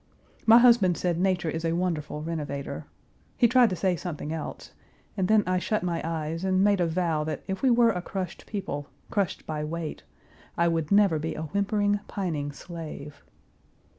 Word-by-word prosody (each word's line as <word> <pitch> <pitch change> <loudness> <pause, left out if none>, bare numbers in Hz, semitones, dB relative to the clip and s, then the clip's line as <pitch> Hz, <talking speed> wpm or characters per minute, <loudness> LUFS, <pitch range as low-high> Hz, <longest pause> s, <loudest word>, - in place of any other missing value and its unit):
My 225 +1 +9
husband 235 -8 +5
said 175 -2 0
Nature 180 -3 +1
is 160 +1 -4
a 165 0 +1
wonderful 165 -4 -2
renovator. 150 -4 -4 0.5
He 240 - +5
tried 245 0 +5
to 185 - -2
say 180 +1 +1
something 160 -3 -5
else 160 - -6 0.4
and 190 -2 0
then 215 0 +4
I 185 0 +1
shut 215 +2 -1
my 170 -2 -1
eyes 165 +1 -3
and 190 0 +2
made 200 -2 +3
a 175 - +2
vow 165 -2 0
that 155 - -4
if 190 -1 -3
we 265 - +4
were 235 -1 +5
a 180 -4 -3
crushed 185 0 -5
people, 145 -9 -4 0.2
crushed 200 -4 -1
by 150 -1 -3
weight, 160 0 -4 0.6
I 170 - +3
would 165 -2 -1
never 200 -6 +4
be 160 +2 -3
a 155 - -4
whimpering, 205 +4 +1
pining 155 -7 -3
slave. 150 -2 -8
175 Hz, 180 wpm, -27 LUFS, 160-200 Hz, 0.6 s, My